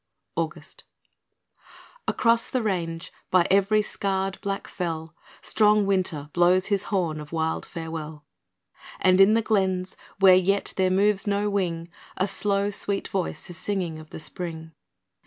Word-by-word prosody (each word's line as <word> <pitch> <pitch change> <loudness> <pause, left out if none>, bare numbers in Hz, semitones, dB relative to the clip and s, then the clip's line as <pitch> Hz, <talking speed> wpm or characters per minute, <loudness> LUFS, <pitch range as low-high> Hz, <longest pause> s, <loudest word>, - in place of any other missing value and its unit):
August - - -5 1.2
Across 230 -1 +2
the 255 -3 -1
range, 170 -5 -3 0.2
by 180 -2 +4
every 200 +2 +4
scarred 195 -2 -2
black 200 0 -3
fell, 160 -3 -4 0.3
Strong 210 -1 +3
Winter 170 -7 -1
blows 180 +2 +4
his 200 -2 0
horn 175 -7 0
of 150 - -11
wild 160 -1 -2
farewell; 160 -2 -7 0.7
And 185 0 +5
in 205 +3 +6
the 230 - +2
glens, 190 -3 0 0.2
where 190 -1 +8
yet 190 +2 +2
there 190 -1 +2
moves 200 +2 +2
no 205 0 0
wing, 170 -4 -1 0.3
A 190 - +2
slow, 200 0 0
sweet 200 0 -1
voice 180 -4 -3
is 170 - -6
singing 185 -5 -3
of 155 0 -13
the - - -8
Spring. 160 -1 -5
190 Hz, 140 wpm, -25 LUFS, 165-200 Hz, 1.2 s, where